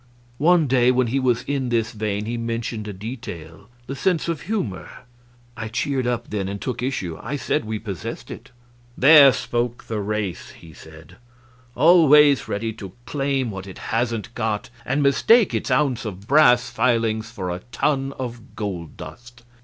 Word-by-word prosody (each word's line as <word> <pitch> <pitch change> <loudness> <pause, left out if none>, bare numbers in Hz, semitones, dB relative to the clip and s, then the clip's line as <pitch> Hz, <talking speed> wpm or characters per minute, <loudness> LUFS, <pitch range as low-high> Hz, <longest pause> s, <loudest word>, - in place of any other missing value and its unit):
One 170 +2 +4
day 125 -2 +3
when 125 0 +3
he 125 +4 0
was 125 -3 +1
in 135 -3 -2
this 115 -1 0
vein 105 -1 -3
he 115 +2 -3
mentioned 115 -2 -4
a - - -4
detail 95 -4 -8 0.2
the 135 - -5
sense 170 +4 0
of 165 -2 -2
humor. 170 - -3 0.7
I 110 0 -5
cheered 130 +2 -1
up 120 -1 -3
then, 100 -3 -2
and 100 +1 -5
took 120 0 -4
issue. 95 - -3
I 145 - -4
said 120 -4 -1
we 110 0 -3
possessed 100 -6 -7
it. - - -10 0.5
"There 140 0 +8
spoke 120 -1 -2
the 110 -2 -4
race!" 105 -3 -4
he 80 -1 -14
said; 80 -1 -15 0.6
"always 150 -2 +6
ready 110 +2 -3
to 100 -4 -10
claim 135 -3 -1
what 95 -1 -7
it 95 - -10 0.2
hasn't 115 0 -1
got, 110 -1 -3 0.2
and 145 +3 +1
mistake 205 - +4
its - - -2
ounce 135 -4 +1
of 100 -2 -7
brass 125 -4 +5
filings 115 -3 0
for 95 -6 -5
a 90 - -4
ton 135 -1 0
of 120 -2 -7
gold 95 -7 -5
dust. 120 0 -12
120 Hz, 170 wpm, -22 LUFS, 105-135 Hz, 0.7 s, There